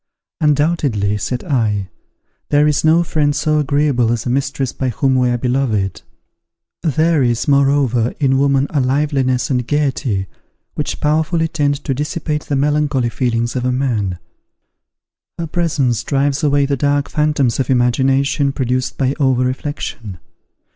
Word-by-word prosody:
"Undoubtedly," 145 -9 +1
said 125 +4 -3
I, 105 - -1 0.6
"there 145 0 +4
is 150 -1 +1
no 160 +2 +4
friend 150 -3 0
so 155 +1 +1
agreeable 140 -5 +1
as 120 -2 -2
a 120 - -1
mistress 135 -1 -1
by 130 - -2
whom 130 +3 +1
we 125 -1 +2
are 120 - 0
beloved. 120 -6 -1 0.8
There 160 0 +2
is, 120 -2 0
moreover, 135 -4 +2
in 135 -2 +2
woman 140 -1 +2
a 150 - +1
liveliness 130 -2 0
and 125 -2 -1
gaiety, 135 -9 0 0.5
which - - -4
powerfully 160 +2 +1
tend 145 -3 -1
to 135 - -1
dissipate 150 +2 -3
the 145 - -2
melancholy 145 -3 +1
feelings 120 -1 -1
of 125 - -1
a 125 - +1
man; 115 -8 -1 1.2
her 170 - -3
presence 150 -8 0
drives 140 +2 0
away 145 -1 +3
the 140 0 0
dark 145 +1 0
phantoms 150 -6 0
of 130 - -1
imagination 135 +3 +2
produced 130 -1 -2
by 135 -1 +1
over 130 -3 +2
reflection. 125 -6 -5
135 Hz, 145 wpm, -17 LUFS, 125-150 Hz, 1.2 s, there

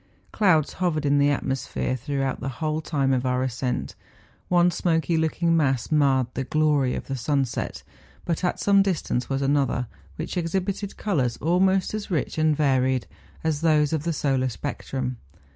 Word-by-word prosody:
Clouds 170 -8 +3
hovered 165 -5 -1
in 145 0 +3
the 140 - +4
atmospher^hrough 135 0 -2
out 135 -1 -2
the 135 - -3
whole 155 0 -1
time 140 -4 0
of 125 -1 +1
our 125 0 0
ascent; 125 0 -2 0.6
one 175 0 +4
smoky 165 -2 0
looking 165 +1 +1
mass 135 -6 +1
marred 140 -4 +3
the 135 - -2
glory 150 -2 +1
of - - -5
the 135 - -3
sunset, 135 0 -2 0.4
but 170 +1 -2
at 180 - 0
some 200 -1 +4
distance 175 -10 -1
was 135 0 -1
another, 135 -3 +1 0.3
which 160 +4 -5
exhibited 190 +4 -2
colours 135 - 0
almost 185 +5 +2
as 215 -1 -4
rich 160 -2 -1
and 155 -1 +3
varied 130 -5 +2 0.4
as 160 -2 0
those 155 -2 +3
of 155 - 0
the 170 - 0
solar 135 -4 0
spectrum. 130 -1 -4
150 Hz, 160 wpm, -25 LUFS, 135-165 Hz, 0.6 s, the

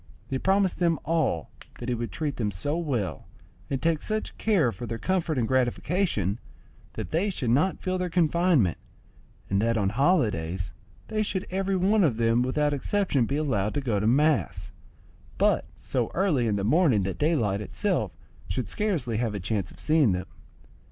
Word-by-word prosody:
He 135 - 0
promised 195 +2 +2
them 170 -2 +2
all 155 - 0 0.3
that 120 - -7
he 125 - +1
would 115 -3 -3
treat 145 - -3
them 110 -3 0
so 105 - -2
well, 135 - -2 0.4
and 135 - -1
take 160 0 +1
such 215 0 -3
care 185 - +3
for 120 +1 -7
their 115 +1 -3
comfort 175 -1 0
and 115 -3 +1
gratification, 130 - 0 0.5
that - - -6
they 180 +6 +1
should 130 - -1
not 155 +10 +2
feel 185 0 -2
their 180 0 -1
confinement, 170 - +2 0.7
and 100 +1 +1
that 115 +1 +1
on 100 -3 +1
holidays 100 - +1 0.4
they 215 -1 0
should 190 -3 -2
every 195 +1 0
one 195 +3 +3
of 135 -9 +2
them 115 +1 +3
without 145 +4 +1
exception 145 - +1
be 140 - -1
allowed 110 -9 0
to - - +1
go 115 -7 0
to 105 - 0
mass; 150 +6 +2 0.7
but - - +2
so 125 -3 -2
early 160 -11 +2
in 105 - +1
the 100 - -1
morning 125 - +3
that 95 0 -3
daylight 115 -11 +1
itself 105 - -1 0.4
should 95 +3 -3
scarcely 155 - -1
have 115 -2 -1
a - - -3
chance 95 0 -2
of - - -16
seeing 155 - +3
them. 90 +1 -3
135 Hz, 180 wpm, -27 LUFS, 110-170 Hz, 0.7 s, care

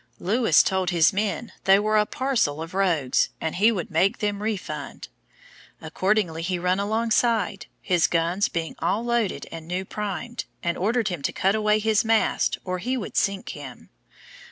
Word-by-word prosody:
Lewis 215 -3 +3
told 190 -1 0
his 170 -4 +4
men 210 +3 -2
they 195 0 +7
were 215 +1 +1
a 210 -1 +3
parcel 245 - 0
of 165 +2 -7
rogues, 170 -9 +1
and 160 +1 -3
he 215 +5 +5
would 185 -7 -4
make 180 +5 +2
them 205 -1 -2
refund; 215 -3 -5 0.7
accordingly 185 -5 0
he 180 +2 -1
run 180 +2 0
alongside, 220 0 0 0.2
his 180 -4 +2
guns 170 +4 +1
being 165 -1 -4
all 225 +4 0
loaded 235 -4 0
and 165 -1 -8
new 180 +2 -3
primed, 210 +4 -5 0.2
and 170 -1 0
ordered 225 +3 0
him 175 -5 -4
to - - -1
cut 195 +1 +1
away 215 0 +2
his 215 0 +2
mast 225 -1 +1
or 185 -1 -2
he 250 +7 -2
would 220 - -6
sink 195 -1 0
him. 140 -4 -9
195 Hz, 170 wpm, -24 LUFS, 175-215 Hz, 0.7 s, they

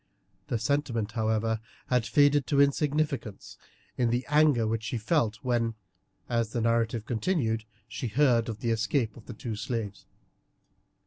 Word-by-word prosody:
The 120 - 0
sentiment, 115 -2 -1
however, 110 0 0 0.3
had 125 -3 +1
faded 145 +4 +4
to 140 - +2
insignificance 140 -5 0 0.4
in 120 -2 +3
the 120 +2 0
anger 150 -6 +4
which 110 0 -1
she 110 +2 -3
felt 115 -1 +1
when, 120 -3 0 0.5
as 115 -2 -1
the 120 - 0
narrative 115 -1 +1
continued, 115 -4 0 0.2
she 110 +4 -4
heard 120 -1 +3
of 110 0 -6
the 115 - 0
escape 115 0 0
of 115 - -14
the - - -6
two 115 0 -5
slaves. 105 -1 -4
115 Hz, 145 wpm, -28 LUFS, 110-135 Hz, 0.5 s, faded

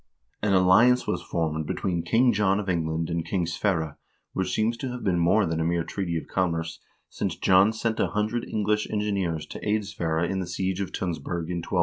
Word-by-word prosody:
An 100 -2 +2
alliance 110 +7 +5
was - - -1
formed 80 -2 -2
between 90 -3 -1
King 115 +9 +3
John 100 -1 +2
of 105 - -4
Eng 85 -3 0
land 80 +1 -2
and 85 -1 -1
King 90 -1 -1
Sverre, 80 -3 -1 0.3
which 95 -1 -1
seems 110 +4 +1
to 130 - -4
have 125 0 -6
been 90 -3 +1
more 95 +5 +4
than 80 -1 -1
a - - +1
mere 85 0 +1
treaty 85 -2 -3
of - - -5
commerce, 85 -3 -1 0.3
since - - -3
John 95 +3 +5
sent 110 0 -2
a - - +3
hundred 110 +3 -1
English 105 0 0
engineers 100 -7 -1
to - - -8
aid 105 0 0
Sverre 85 -3 -1
in 95 +2 -2
the 90 - -3
siege 95 +2 -2
of 95 - -3
Tunsberg 85 0 -3
in 90 - -2
1201. 90 +2 -1
95 Hz, 215 wpm, -26 LUFS, 85-105 Hz, 0.3 s, alliance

